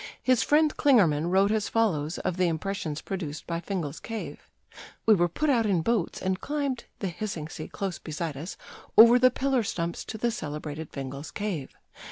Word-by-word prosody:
His 255 -3 +4
friend 300 +1 +3
Klingermann 175 - +4
wrote 195 +3 +4
as 215 -1 0
follows 175 -9 +1
of 180 - -2
the 185 -1 +3
impressions 160 -2 -3
produced 165 -6 -5
by 170 -1 -2
Fingal's 170 -5 -4
Cave: 225 -1 -7 0.6
"We 220 - +7
were 175 -3 +3
put 305 - -1
out 230 -4 +2
in 180 -5 +2
boats, 220 -5 0
and 190 +1 -1
climbed, 280 -4 -2
the 195 - -3
hissing 175 -4 -4
sea 155 -1 -7
close 195 -3 -4
beside 155 -1 -4
us, 160 +7 -7 0.4
over 235 +3 +9
the 255 +1 +6
pillar 265 0 +1
stumps 170 -5 -3
to 220 - -6
the 235 +2 0
celebrated 150 -4 -5
Fingal's 140 +2 -6
Cave. 195 -10 -4
190 Hz, 180 wpm, -27 LUFS, 160-225 Hz, 0.6 s, over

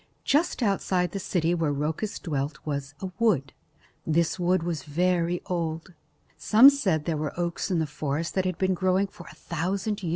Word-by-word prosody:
Just 290 -2 +1
outside 185 -4 +1
the 195 - -4
city 175 -2 0
where 165 -4 0
Rhoecus 155 +8 -2
dwelt 145 -2 -3
was 140 -1 -4
a 190 -1 -4
wood. 170 - +2 0.5
This 165 +3 +1
wood 180 -1 +2
was 165 -4 -2
very 175 +3 0
old. 165 0 -3 0.4
Some 240 +6 +7
said 190 - 0
there 165 - 0
were 155 +3 -4
oaks 170 +2 -2
in 180 - +1
the 160 - +1
forest 150 +2 -3
that 190 -1 0
had 185 -2 -1
been 190 0 +1
growing 185 +2 +2
for 180 -3 -13
a - - -13
thousand 190 +5 -3
years. 175 - -3
175 Hz, 185 wpm, -26 LUFS, 155-190 Hz, 0.5 s, Some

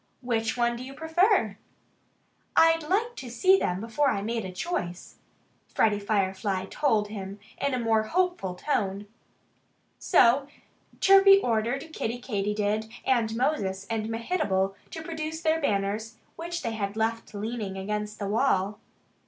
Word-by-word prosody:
"Which 225 -2 -1
one 240 0 +2
do 240 - -7
you 270 +1 -9
prefer?" 320 - +2 1.0
"I'd 325 0 +5
have 410 +10 0
to 250 - -7
see 375 +11 +4
them 180 +1 -1
before 230 +7 +1
I 200 -6 -1
made 225 -1 -2
a 185 - -5
choice," 180 - -4 0.5
Freddie 210 -2 +2
Firefly 195 -2 -1
told 220 -8 +1
him 200 -1 -7 0.2
in 280 -2 0
a - - -1
more 225 -2 +2
hopeful 350 - -1
tone. 200 -3 -1 0.9
So 270 -4 +4 0.5
Chirpy 390 0 +8
ordered 245 - -1
Kiddie 235 -4 -2
Katydid 210 -1 -1 0.2
and 230 -4 +1
Moses 200 -7 -1
and 220 -1 -2
Mehitable 225 - 0 0.2
to 320 - -7
produce 320 0 -5
their 320 0 +1
banners, 215 -1 -1 0.2
which 345 +1 -5
they 230 - -1
had 205 -1 -3
left 225 0 -2
leaning 210 -2 -4
against 210 +2 -3
the 200 - -3
wall. 205 -2 +1
225 Hz, 140 wpm, -27 LUFS, 205-300 Hz, 1.0 s, Chirpy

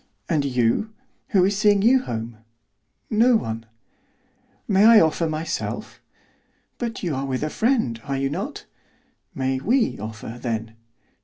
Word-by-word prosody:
"And 155 -3 +1
you, 125 - +1 0.4
who 195 -8 +3
is 200 +1 +1
seeing 205 -1 +3
you 255 +3 +5
home?" 115 - -5 0.7
"No 230 +3 +4
one." 115 - -3 1.0
"May 200 +1 +4
I 225 -1 +9
offer 160 0 +2
myself?" 155 +2 -4 0.8
"But 235 -3 -4
you 170 -4 -1
are 135 0 -3
with 130 +1 -2
a 155 - -2
friend, 225 - 0
are 140 -1 -2
you 135 0 -1
not?" 200 - -5 0.7
"May 130 -2 -1
we 235 - +1
offer, 110 +2 -7
then?" 115 -2 -3
155 Hz, 140 wpm, -23 LUFS, -, 1.0 s, I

